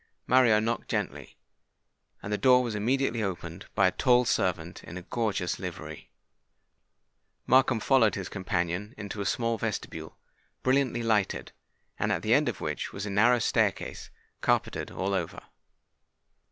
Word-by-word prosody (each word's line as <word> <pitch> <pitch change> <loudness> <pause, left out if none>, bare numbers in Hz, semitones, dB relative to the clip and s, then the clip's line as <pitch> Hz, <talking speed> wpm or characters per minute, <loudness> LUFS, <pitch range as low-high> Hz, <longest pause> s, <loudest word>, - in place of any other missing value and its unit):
Mario 120 -4 +5
knocked 115 +2 -2
gently; - - -3 0.9
and 100 - -3
the - - +1
door 125 -1 +5
was 120 -3 -3
immediately 120 +2 0
opened 90 -3 -5
by 100 - +4
a 95 - +4
tall 125 +3 +3
servant 90 -6 -1
in 85 - -8
a 90 - -7
gorgeous 100 -4 -2
livery. - - -7 1.4
Markham 130 -2 +4
followed 115 -4 +3
his 95 -2 -4
companion 95 +2 -2
into 100 0 -5
a 100 - -1
small 115 +4 0
vestibule, 110 -2 -4 0.5
brilliantly 130 -2 +2
lighted, 110 -4 0 0.5
and - - +1
at - - -1
the - - +3
end - - +4
of - - -5
which - - -3
was 100 +1 -5
a 100 - -4
narrow 115 +5 +4
staircase 115 - 0 0.3
carpetted - - 0
all 95 +1 -2
over. 95 - -3
105 Hz, 145 wpm, -28 LUFS, 95-120 Hz, 1.4 s, Mario